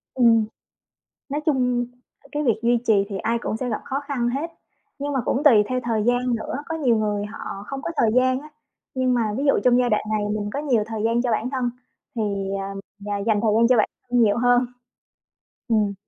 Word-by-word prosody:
Ừm. 230 Hz, -3 st, +5 dB, 0.8 s
Nói 290 Hz, +2 st, -2 dB
chung, 250 Hz, -4 st, +1 dB, 0.4 s
ờ, -, -, -17 dB
cái 295 Hz, +1 st, -1 dB
việc 235 Hz, -6 st, +2 dB
duy 240 Hz, +1 st, +4 dB
trì 220 Hz, -, +6 dB, 0.2 s
thì 200 Hz, -, -3 dB
ai 230 Hz, +4 st, 0 dB
cũng 220 Hz, -, -2 dB
sẽ 250 Hz, +1 st, -3 dB
gặp 215 Hz, -, -2 dB
khó 270 Hz, -, -2 dB
khăn 245 Hz, -4 st, 0 dB
hết. 285 Hz, +7 st, -3 dB, 0.5 s
Nhưng 285 Hz, +1 st, -2 dB
mà 270 Hz, -, +1 dB
cũng 275 Hz, -, 0 dB
tùy 230 Hz, -9 st, +7 dB
theo 255 Hz, 0 st, 0 dB
thời 225 Hz, -3 st, 0 dB
gian 245 Hz, +1 st, +1 dB
nữa, 225 Hz, -, -4 dB
có 325 Hz, -, -3 dB
nhiều 250 Hz, -7 st, +2 dB
người 210 Hz, -1 st, -1 dB
họ 205 Hz, -1 st, -7 dB
không 275 Hz, -1 st, -5 dB
có 335 Hz, -, -3 dB
thời 220 Hz, -, +3 dB
gian 255 Hz, 0 st, +3 dB
á, 305 Hz, -, -12 dB, 0.4 s
nhưng 255 Hz, -1 st, +1 dB
mà 240 Hz, -, +2 dB, 0.2 s
ví 275 Hz, -, -1 dB
dụ 275 Hz, -, +5 dB
trong 250 Hz, 0 st, +5 dB
giai 245 Hz, -1 st, +2 dB
đoạn 215 Hz, -, +1 dB
này 215 Hz, -1 st, +1 dB, 0.2 s
mình 205 Hz, 0 st, -3 dB
có 280 Hz, -, -1 dB
nhiều 260 Hz, -8 st, +1 dB
thời 220 Hz, -1 st, -4 dB
gian 230 Hz, +1 st, +2 dB
cho 245 Hz, -1 st, 0 dB
bản 220 Hz, +3 st, 0 dB
thân 255 Hz, -2 st, -1 dB, 0.5 s
thì, 230 Hz, -, -1 dB, 0.4 s
ờ, 195 Hz, 0 st, -5 dB, 0.3 s
d 205 Hz, -, -10 dB, 0.2 s
dành 210 Hz, -2 st, +3 dB
thời 225 Hz, -2 st, +2 dB
gian 230 Hz, +1 st, +5 dB
cho 250 Hz, -, +5 dB
bản 215 Hz, -, +3 dB, 0.2 s
thân 245 Hz, 0 st, +2 dB
nhiều 210 Hz, -1 st, +3 dB
hơn. 245 Hz, +1 st, +4 dB, 1.0 s
Ừm. 215 Hz, -4 st, +2 dB
240 Hz, 230 wpm, -23 LUFS, 220-260 Hz, 1.0 s, tùy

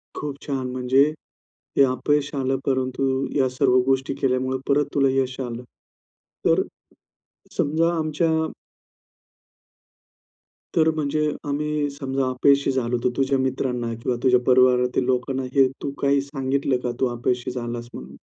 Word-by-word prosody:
खूप 145 Hz, -2 st, -4 dB
छान. 135 Hz, -3 st, -2 dB
म्हणजे 130 Hz, +2 st, +3 dB, 0.8 s
हे -, -, +8 dB
अपयश 140 Hz, +3 st, 0 dB
आलं, 135 Hz, -1 st, 0 dB
परंतु 130 Hz, 0 st, 0 dB
या 135 Hz, -2 st, +3 dB
सर्व 130 Hz, 0 st, +2 dB
गोष्टी 135 Hz, 0 st, +1 dB
केल्यामुळे 130 Hz, -1 st, 0 dB
परत 145 Hz, +1 st, +3 dB
तुला 140 Hz, -1 st, +3 dB
यश 130 Hz, 0 st, -3 dB
आलं. 120 Hz, -2 st, -4 dB, 0.8 s
तर -, -, +4 dB
अ, -, -, -8 dB, 0.9 s
समजा 160 Hz, +3 st, +2 dB
आमच्या 160 Hz, +1 st, 0 dB, 2.4 s
तर 160 Hz, -1 st, +4 dB
म्हणजे 150 Hz, 0 st, 0 dB, 0.2 s
आम्ही 150 Hz, 0 st, -1 dB
समजा 135 Hz, -2 st, -2 dB
अपयशी 140 Hz, +2 st, +3 dB
झालो 125 Hz, -2 st, -1 dB
होतो. 120 Hz, +1 st, 0 dB
तुझ्या 135 Hz, 0 st, +2 dB
मित्रांना 125 Hz, -2 st, -1 dB
किंवा 115 Hz, +2 st, -2 dB
तुझ्या 125 Hz, -1 st, +5 dB
परिवारातील 125 Hz, 0 st, +4 dB
लोकांना 130 Hz, +1 st, -1 dB
हे 135 Hz, -1 st, +6 dB
तू 140 Hz, -, -3 dB
काही 140 Hz, 0 st, +3 dB
सांगितलं 135 Hz, -1 st, -1 dB
का, 125 Hz, -, -1 dB
तू 130 Hz, -, +2 dB
अपयशी 120 Hz, +1 st, -1 dB
झालास 120 Hz, -1 st, -5 dB
म्हणून? 65 Hz, +3 st, -10 dB
130 Hz, 135 wpm, -23 LUFS, 125-140 Hz, 2.4 s, हे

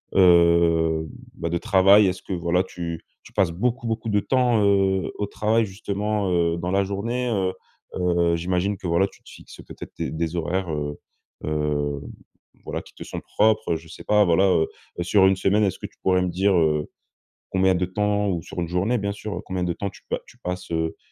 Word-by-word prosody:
heu, 85 Hz, -3 st, +4 dB, 0.3 s
bah, 85 Hz, -, -3 dB
de 85 Hz, -, 0 dB
travail. 100 Hz, 0 st, +5 dB
Est-ce 90 Hz, 0 st, -2 dB
que, -, -, -5 dB
voilà, 85 Hz, +1 st, +1 dB
tu 85 Hz, -3 st, -6 dB, 0.2 s
tu -, -, -15 dB
passes 95 Hz, -4 st, +2 dB
beaucoup, 115 Hz, +6 st, -1 dB
beaucoup 115 Hz, 0 st, -2 dB
de 105 Hz, -, +3 dB
temps, 120 Hz, -1 st, +2 dB
heu, 95 Hz, -1 st, +2 dB
au 105 Hz, -, -1 dB
travail 110 Hz, +2 st, +1 dB
justement, 100 Hz, 0 st, -2 dB
heu, 85 Hz, -1 st, +1 dB
dans 90 Hz, +1 st, -3 dB
la 100 Hz, +1 st, +2 dB
journée? 115 Hz, +6 st, -2 dB
Heu 95 Hz, -4 st, 0 dB, 0.5 s
heu, 85 Hz, -1 st, +2 dB
j'imagine 90 Hz, +4 st, -1 dB
que 90 Hz, -, -6 dB
voilà, 85 Hz, +4 st, +2 dB
tu -, -, -20 dB
te -, -, -15 dB
fixes -, -, -13 dB
peut-être -, -, -10 dB
tes -, -, -4 dB
des 80 Hz, +1 st, -2 dB
horaires, 90 Hz, +2 st, -1 dB
heu 75 Hz, -1 st, -4 dB, 0.5 s
heu, 75 Hz, -2 st, -1 dB, 0.6 s
voilà, -, -, -4 dB
qui -, -, -18 dB
te -, -, -8 dB
sont -, -, -6 dB
propres, 110 Hz, -5 st, +1 dB
heu, -, -, +1 dB
je 80 Hz, 0 st, -8 dB
sais 80 Hz, -, -11 dB
pas, 105 Hz, 0 st, +4 dB
voilà, 90 Hz, +2 st, +3 dB
heu 85 Hz, -4 st, +3 dB, 0.3 s
heu, -, -, 0 dB
sur 95 Hz, +2 st, +4 dB
1 95 Hz, -, +3 dB
semaine, 100 Hz, +3 st, +2 dB
est-ce 95 Hz, -4 st, 0 dB
que -, -, -7 dB
tu -, -, -30 dB
pourrais 95 Hz, -1 st, +2 dB
me 90 Hz, -, 0 dB
dire, 95 Hz, +3 st, +2 dB
heu, 75 Hz, -3 st, +2 dB, 0.6 s
combien 95 Hz, 0 st, +3 dB
de 90 Hz, +1 st, 0 dB
temps? 105 Hz, +2 st, 0 dB
Ou 85 Hz, -4 st, -1 dB
sur 90 Hz, -, -6 dB
1 85 Hz, -, -2 dB
journée 95 Hz, +8 st, 0 dB
bien 100 Hz, 0 st, -2 dB
sûr, 105 Hz, 0 st, -5 dB
combien 95 Hz, -1 st, -3 dB
de 85 Hz, -, 0 dB
temps 100 Hz, +3 st, -4 dB
tu -, -, -17 dB
pa -, -, -1 dB
tu -, -, -18 dB
passes? 90 Hz, 0 st, -5 dB
Heu 80 Hz, 0 st, -1 dB
95 Hz, 215 wpm, -24 LUFS, 85-100 Hz, 0.6 s, travail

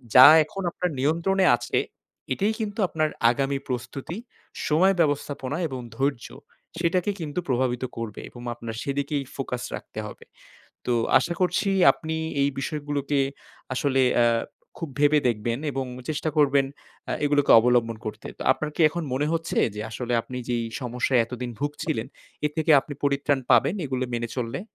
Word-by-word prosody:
যা 130 Hz, +1 st, +12 dB, 0.2 s
এখন 195 Hz, +5 st, -7 dB
আপনার 180 Hz, -, -2 dB
নিয়ন্ত্রণে 170 Hz, +7 st, +2 dB
আছে, 120 Hz, -, -2 dB, 0.6 s
এটাই 205 Hz, +9 st, 0 dB
কিন্তু 215 Hz, 0 st, -4 dB
আপনার 155 Hz, -1 st, 0 dB, 0.2 s
আগামী 135 Hz, +2 st, -1 dB
প্রস্তুতি, 130 Hz, -, -5 dB, 0.5 s
সময় 185 Hz, +6 st, +4 dB
ব্যবস্থাপনা, 145 Hz, -2 st, 0 dB
এবং 130 Hz, -3 st, -5 dB, 0.2 s
ধৈর্য 135 Hz, -3 st, -1 dB, 0.5 s
সেটাকে 180 Hz, +3 st, +1 dB
কিন্তু 150 Hz, +2 st, -3 dB
প্রভাবিত 125 Hz, -1 st, 0 dB
করবে 115 Hz, -3 st, -5 dB
এবং 120 Hz, -, -12 dB
আপনার 115 Hz, -1 st, -7 dB
সেদিকেই 140 Hz, +1 st, -1 dB
ফোকাস 125 Hz, -2 st, -4 dB
রাখতে 110 Hz, -, -8 dB
হবে। -, -, -11 dB, 0.6 s
তো 125 Hz, -, +1 dB, 0.3 s
আশা 170 Hz, -, -2 dB
করছি 180 Hz, +2 st, +1 dB, 0.2 s
আপনি 160 Hz, -1 st, -5 dB, 0.3 s
এই 140 Hz, -, +3 dB
বিষয়গুলোকে 145 Hz, -1 st, -1 dB, 0.5 s
আসলে 135 Hz, 0 st, +2 dB, 0.2 s
আ -, -, +5 dB, 0.5 s
খুব 165 Hz, -, -4 dB
ভেবে 150 Hz, +1 st, +5 dB
দেখবেন 115 Hz, +2 st, -1 dB
এবং 135 Hz, 0 st, -2 dB, 0.2 s
চেষ্টা 155 Hz, +1 st, -1 dB
করবেন 140 Hz, -2 st, +4 dB, 0.4 s
আ -, -, +1 dB
এগুলোকে 145 Hz, -1 st, +2 dB
অবলম্বন 120 Hz, -1 st, +2 dB
করতে। 110 Hz, -, -6 dB
তো -, -, -4 dB
আপনার 155 Hz, -1 st, -4 dB
কি -, -, -3 dB
এখন 170 Hz, +3 st, -4 dB
মনে 145 Hz, +3 st, 0 dB
হচ্ছে, 165 Hz, 0 st, -1 dB, 0.2 s
যে 105 Hz, -, -5 dB
আসলে 120 Hz, +2 st, -4 dB
আপনি 125 Hz, -, -7 dB
যেই 120 Hz, -1 st, 0 dB, 0.2 s
সমস্যায় 125 Hz, 0 st, +1 dB
এতদিন 125 Hz, 0 st, -5 dB
ভুগছিলেন 145 Hz, -4 st, -2 dB, 0.4 s
এর 150 Hz, -, +1 dB
থেকে 160 Hz, 0 st, +1 dB
আপনি 145 Hz, -, -8 dB
পরিত্রাণ 140 Hz, 0 st, +2 dB
পাবেন 125 Hz, -, +5 dB
এগুলো 130 Hz, -1 st, -1 dB
মেনে 115 Hz, 0 st, -2 dB
চললে? 120 Hz, +6 st, -3 dB
140 Hz, 155 wpm, -25 LUFS, 125-155 Hz, 0.6 s, যা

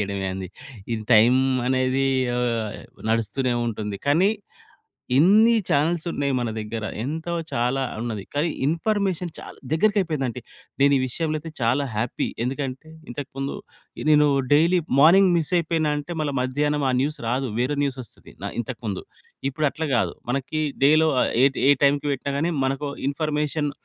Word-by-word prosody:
జేయడమే 100 Hz, -1 st, -2 dB
ఏంది. 95 Hz, -1 st, -5 dB, 0.4 s
ఇది 110 Hz, -1 st, -2 dB
టైం 115 Hz, +3 st, +6 dB, 0.3 s
అనేది 130 Hz, +1 st, +1 dB, 0.3 s
ఆహ్, 115 Hz, -3 st, -1 dB, 0.3 s
నడుస్తూనే 115 Hz, +3 st, 0 dB
ఉంటుంది. 105 Hz, -3 st, -3 dB
కానీ 175 Hz, +8 st, +4 dB, 0.9 s
ఇన్ని 210 Hz, -, +6 dB
చానెల్స్ 160 Hz, +4 st, +1 dB
ఉన్నాయి 140 Hz, -1 st, -1 dB
మన 120 Hz, -2 st, -1 dB
దగ్గర. 110 Hz, +1 st, -4 dB, 0.2 s
ఎంతో 160 Hz, +6 st, -3 dB, 0.2 s
చాలా 125 Hz, +3 st, 0 dB, 0.2 s
ఉన్నది. 110 Hz, -4 st, -4 dB
కానీ, 150 Hz, +4 st, +1 dB, 0.2 s
ఇన్ఫర్మేషన్ 180 Hz, +2 st, 0 dB
చాలా -, -, -10 dB, 0.2 s
దగ్గరికి 205 Hz, +6 st, +2 dB
అయిపోయిందంటే, 135 Hz, -9 st, -2 dB, 0.4 s
నేను 140 Hz, +1 st, +5 dB
ఈ -, -, 0 dB
విషయంలో 155 Hz, +4 st, -2 dB
అయితే 160 Hz, +1 st, -9 dB
చాలా 125 Hz, +5 st, +2 dB
హ్యాపీ. 115 Hz, +3 st, -2 dB, 0.2 s
ఎందుకంటే, 135 Hz, +3 st, -4 dB, 0.2 s
ఇంతకు 140 Hz, +3 st, -6 dB
ముందు 135 Hz, 0 st, -3 dB, 0.5 s
నేను 150 Hz, -1 st, +6 dB, 0.3 s
డైలీ 170 Hz, +5 st, +4 dB, 0.2 s
మార్నింగ్ 185 Hz, +5 st, +7 dB
మిస్ 160 Hz, 0 st, -2 dB
అయిపోయిన 160 Hz, -1 st, 0 dB
అంటే, 145 Hz, +4 st, -6 dB
మళ్ళ 145 Hz, -2 st, -1 dB
మధ్యాహ్నం 145 Hz, +3 st, 0 dB
ఆ -, -, +2 dB
న్యూస్ 150 Hz, +3 st, -2 dB
రాదు. 125 Hz, +1 st, -1 dB
వేరే 140 Hz, +3 st, -1 dB
న్యూస్ 135 Hz, -2 st, -2 dB
వస్తది 115 Hz, -, -16 dB
న -, -, -2 dB
ఇంతకు 120 Hz, -1 st, -4 dB
ముందు. 95 Hz, -2 st, -3 dB, 0.5 s
ఇప్పుడు 150 Hz, +2 st, 0 dB
అట్లా 160 Hz, -1 st, -3 dB
గాదు. 120 Hz, -, +1 dB, 0.2 s
మనకి 140 Hz, +4 st, -2 dB, 0.2 s
డేలో 155 Hz, +2 st, +5 dB
ఆహ్, -, -, +1 dB
ఏ -, -, +8 dB, 0.2 s
ఏ -, -, +9 dB
టైంకి 140 Hz, +1 st, +2 dB
పెట్టినా 140 Hz, +1 st, -3 dB
గాని 165 Hz, +4 st, 0 dB
మనకు 135 Hz, +2 st, -2 dB, 0.2 s
ఇన్ఫర్మేషన్ 150 Hz, 0 st, -1 dB
140 Hz, 155 wpm, -23 LUFS, 125-155 Hz, 0.9 s, ఏ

